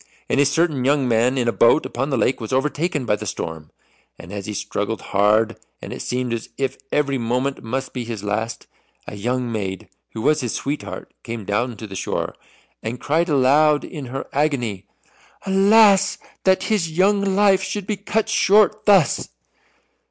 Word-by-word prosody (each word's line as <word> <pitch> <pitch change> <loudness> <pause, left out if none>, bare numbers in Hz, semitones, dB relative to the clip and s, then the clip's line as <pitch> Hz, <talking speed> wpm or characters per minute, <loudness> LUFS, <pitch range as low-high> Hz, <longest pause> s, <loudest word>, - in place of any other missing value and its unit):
And - - +1
a 140 - +5
certain 150 -2 +1
young 140 0 +2
man 120 +3 +2
in 120 -2 0
a - - +3
boat 115 +7 +4
upon 135 +4 -3
the 135 - 0
lake 125 +2 +1
was 110 - -5
overtaken 150 +2 0
by 105 - +2
the - - -7
storm. 80 -2 -5 0.5
And 90 - -11
as 100 -1 -5
he 105 - -4
struggled 105 +3 -3
hard, 105 +3 +3 0.2
and - - -7
it - - -7
seemed 125 -1 -2
as 115 - -5
if 135 -1 -2
every 140 -3 +1
moment 125 +4 -1
must 130 +4 -4
be 125 - -3
his 115 -3 -6
last, 110 +3 -3 0.4
a - - -8
young 120 +3 -2
maid 95 -5 -4 0.2
who 110 - -5
was 155 0 +3
his 120 -3 -2
sweetheart 145 +2 -5
came 115 -3 -6
down 110 +4 -1
to 110 - -7
the 100 -2 -9
shore, - - -3 0.5
and 115 +3 -5
cried 165 +4 0
aloud 145 +2 +4
in 145 -4 -7
her 135 +2 -5
agony, 125 -10 -1 0.6
"Alas, 200 +1 +5 0.3
that 190 -1 +3
his 205 -7 0
young 195 +5 +2
life 195 0 +3
should 200 +1 -4
be 210 - -1
cut 215 +2 -1
short 215 +2 +3
thus!" 195 -7 +4
130 Hz, 180 wpm, -21 LUFS, 115-160 Hz, 0.6 s, a